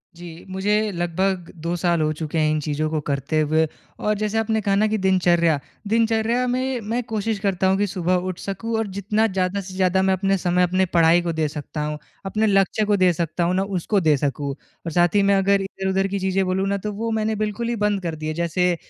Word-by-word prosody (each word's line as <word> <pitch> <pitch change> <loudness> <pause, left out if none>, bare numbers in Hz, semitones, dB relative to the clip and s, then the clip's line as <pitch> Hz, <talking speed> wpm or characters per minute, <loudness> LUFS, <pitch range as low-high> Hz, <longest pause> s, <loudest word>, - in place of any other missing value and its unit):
जी, 170 -1 -10
मुझे 210 +3 0
लगभग 175 +1 -1
2 170 +1 -1
साल 170 -2 +1
हो 155 0 +1
चुके 155 +1 -4
हैं 155 -1 +3
इन 155 - +1
चीज़ों 155 +1 -1
को 155 -1 -1
करते 140 +3 0
हुए। 155 +1 +2 0.3
और 210 - +1
जैसे 215 +1 -1
आपने 220 0 +1
कहा 195 0 +1
ना 215 +2 +3
कि 215 0 0
दिनचर्या, 175 -5 +3 0.3
दिनचर्या 225 +2 +2
में 255 0 -1
मैं 230 +4 -2
कोशिश 220 -1 -2
करता 190 -2 +1
हूँ 190 +1 +3
कि 205 0 +1
सुबह 180 -1 0
उठ 185 - -6
सकूँ 225 +4 -4
और 220 -2 -1
जितना 210 +3 +1
ज़्यादा 190 0 -1
से 185 0 -9
ज़्यादा 185 0 +2
मैं 190 0 +3
अपने 195 +1 +1
समय 180 0 +1
अपने 185 +1 +2
पढ़ाई 170 +1 +5
को 170 -1 -2
दे 155 -1 0
सकता 150 +1 -6
हूँ, 150 0 -3 0.3
अपने 215 +3 +1
लक्ष्य 195 +2 +2
को 205 -1 +2
दे 185 -1 +4
सकता 170 +1 -2
हूँ 180 +2 +1
ना, 190 - +2
उसको 195 +1 0
दे 155 -4 +3
सकूँ। 140 0 -2 0.4
और 165 - -3
साथ 175 +3 +2
ही 200 - +5
मैं 200 0 +4
अगर 195 0 +3
इधर-उधर 195 0 -1
की 200 0 -3
चीज़ें 190 0 +1
बोलूँ 190 +1 0
ना, 200 0 0
तो 210 +2 -4
वो 225 +2 -3
मैंने 220 0 0
बिल्कुल 215 +2 -2
ही 240 - 0
बंद 210 -2 0
कर 165 -2 -2
दिए 155 0 -4
जैसे 170 +2 +1
190 Hz, 230 wpm, -22 LUFS, 170-210 Hz, 0.4 s, पढ़ाई